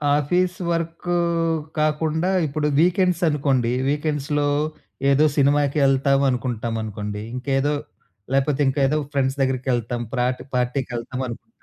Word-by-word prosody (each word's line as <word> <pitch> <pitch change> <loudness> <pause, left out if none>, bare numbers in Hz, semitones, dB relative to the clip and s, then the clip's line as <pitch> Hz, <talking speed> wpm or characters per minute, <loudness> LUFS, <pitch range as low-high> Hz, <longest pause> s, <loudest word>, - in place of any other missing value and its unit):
Office 180 +5 +1
work 165 +1 -3 0.7
కాకుండా, 155 +3 +1 0.2
ఇప్పుడు 150 +1 -1
వీకెండ్సనుకోండి 160 -8 +2 0.2
వీకెండ్స్‌లో, 150 -1 0 0.6
ఏదో 145 +3 +4
సినిమాకి 145 +1 +3
వెళ్తాం 135 0 +3
అనుకుంటామనుకోండి. 110 -4 -3
ఇంకేదో 135 +3 0 0.6
లేకపోతే, 135 +1 +1
ఇంకేదో 135 +2 +2 0.2
ఫ్రెండ్స్ 135 0 0
దగ్గరికి 130 0 0
వెళ్తాం, 120 0 -2
ప్రాట్ 125 0 0
పార్టీకి 125 +1 -1
వెళ్తాం 125 +2 -4
అనుకుంటాం. 120 - -9
140 Hz, 105 wpm, -22 LUFS, 125-150 Hz, 0.7 s, ఏదో